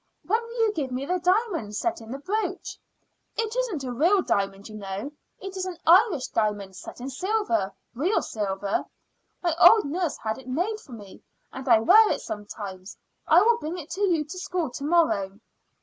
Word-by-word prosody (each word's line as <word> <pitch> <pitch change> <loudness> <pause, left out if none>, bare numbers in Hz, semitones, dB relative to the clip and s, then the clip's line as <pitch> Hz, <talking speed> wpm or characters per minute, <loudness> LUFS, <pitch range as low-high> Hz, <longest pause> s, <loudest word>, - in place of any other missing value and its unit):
"When 445 +5 +1
will 465 +1 -8
you 440 -2 +3
give 290 -7 -2
me 255 +2 -3
the 360 +4 0
diamond 360 - 0
set 340 +4 -1
in 225 - -12
the 265 - -4
brooch?" 410 +10 -3 0.6
"It 450 0 -1
isn't 460 - -1
a 255 - -4
real 345 +10 +3
diamond, 195 0 -1
you 215 - -11
know. 200 +6 -5 0.3
It 390 -1 -7
is 375 0 -3
an 360 -2 -6
Irish 345 - +5
diamond 205 -3 -1
set - - -10
in 250 - -6
silver 365 - 0 0.2
real 330 - +1
silver. 200 -2 -2 0.6
My 340 -2 +1
old 430 +5 +8
nurse 330 +2 -2
had 220 +1 -3
it 260 - -14
made 360 +12 -1
for 265 - -14
me, 205 -4 -11 0.3
and 265 0 -6
I 225 -2 +6
wear 425 - +7
it - - -1
sometimes. 205 -2 -7 0.3
I 345 +4 +6
will 470 +1 +3
bring 325 0 -4
it 330 -1 -9
to 380 +4 -4
you 345 -6 +2
to 335 +5 -8
school 360 -6 -2
to 275 - -7
morrow." 285 - +1
310 Hz, 195 wpm, -26 LUFS, -, 0.6 s, old